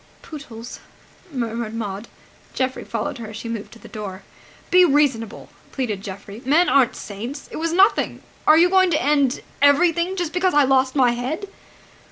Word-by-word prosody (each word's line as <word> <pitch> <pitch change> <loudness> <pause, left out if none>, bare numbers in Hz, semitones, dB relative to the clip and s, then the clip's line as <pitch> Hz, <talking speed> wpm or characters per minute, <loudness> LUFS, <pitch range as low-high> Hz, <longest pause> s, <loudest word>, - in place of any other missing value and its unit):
"Pootles!" 245 -6 -9 0.5
murmured 230 -3 -3
Maud. 210 -1 -5 0.5
Geoffrey 260 0 -2
followed 230 +2 -4
her 225 - -7
as 215 0 -8
she 230 - -7
moved 230 -2 -5
to - - -13
the - - -14
door. 195 -3 -7 0.5
"Be 365 0 +7
reasonable!" 275 - +1 0.2
pleaded 220 -8 -3
Geoffrey. 200 +2 -9
"Men 310 +7 +3
aren't 260 -3 +3
saints! 235 +8 -7
It - - -6
was 330 +1 -1
nothing!... 380 +4 +2 0.2
Are 310 - +7
you 345 +2 +6
going 375 0 +4
to 305 -3 +1
end... 280 -2 +1 0.2
everything... 340 +5 +3
just 350 -4 -3
because 365 -2 +1
I 295 - +6
lost 265 0 +2
my 255 -3 +4
head?" 265 +11 -4
260 Hz, 170 wpm, -22 LUFS, 225-315 Hz, 0.5 s, Be